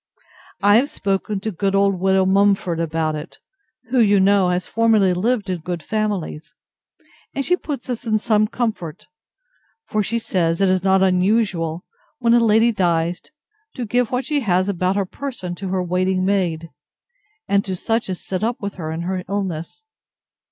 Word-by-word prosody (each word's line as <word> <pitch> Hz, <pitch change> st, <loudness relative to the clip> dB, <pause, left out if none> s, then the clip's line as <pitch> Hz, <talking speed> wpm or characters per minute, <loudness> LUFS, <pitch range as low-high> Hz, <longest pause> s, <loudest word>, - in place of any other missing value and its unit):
I 205 Hz, +1 st, +6 dB
have 275 Hz, +5 st, +2 dB
spoken 195 Hz, -2 st, -2 dB
to 220 Hz, -, -3 dB
good 195 Hz, +2 st, -1 dB
old 195 Hz, -1 st, +2 dB
widow 190 Hz, 0 st, +3 dB
Mumford 195 Hz, -3 st, +2 dB
about 160 Hz, -1 st, -1 dB
it, 150 Hz, +3 st, -7 dB, 0.5 s
who, 255 Hz, -, +3 dB
you 205 Hz, -3 st, +5 dB
know, 195 Hz, -1 st, +4 dB
has 180 Hz, -1 st, -1 dB
formerly 220 Hz, -5 st, +3 dB
lived 210 Hz, +3 st, 0 dB
in 185 Hz, -2 st, -2 dB
good 170 Hz, -1 st, -5 dB
families; 195 Hz, -5 st, -3 dB, 0.8 s
and 275 Hz, -, -1 dB
she 360 Hz, -, +3 dB
puts 290 Hz, -7 st, -6 dB
us 245 Hz, -3 st, -4 dB
in 215 Hz, -1 st, +2 dB
some 215 Hz, -1 st, +2 dB
comfort; 210 Hz, -10 st, -4 dB, 0.8 s
for 215 Hz, -, -1 dB
she 230 Hz, +3 st, -1 dB
says 170 Hz, -7 st, 0 dB
it 195 Hz, -1 st, +3 dB
is 185 Hz, -1 st, +1 dB
not 190 Hz, 0 st, +4 dB
unusual, 185 Hz, -3 st, +1 dB, 0.3 s
when 235 Hz, -3 st, +2 dB
a 240 Hz, -, +6 dB
lady 225 Hz, +1 st, +4 dB
dies, 175 Hz, -4 st, 0 dB, 0.5 s
to 250 Hz, -, -3 dB
give 245 Hz, +1 st, +1 dB
what 250 Hz, 0 st, -1 dB
she 295 Hz, +1 st, 0 dB
has 185 Hz, -6 st, +1 dB
about 185 Hz, -1 st, 0 dB
her 200 Hz, -1 st, 0 dB
person 235 Hz, -5 st, -6 dB
to 190 Hz, +2 st, -6 dB
her 185 Hz, -1 st, 0 dB
waiting 185 Hz, +1 st, 0 dB
maid, 175 Hz, -5 st, -1 dB, 0.8 s
and 200 Hz, 0 st, +2 dB
to 190 Hz, -, -2 dB
such 225 Hz, +4 st, -1 dB
as 185 Hz, -, -3 dB
sit 185 Hz, +1 st, -3 dB
up 235 Hz, +2 st, -1 dB
with 200 Hz, -1 st, -4 dB
her 155 Hz, 0 st, -4 dB
in 160 Hz, +1 st, -4 dB
her 185 Hz, +1 st, -3 dB
illness. 195 Hz, -, -4 dB
195 Hz, 175 wpm, -21 LUFS, 180-220 Hz, 0.8 s, I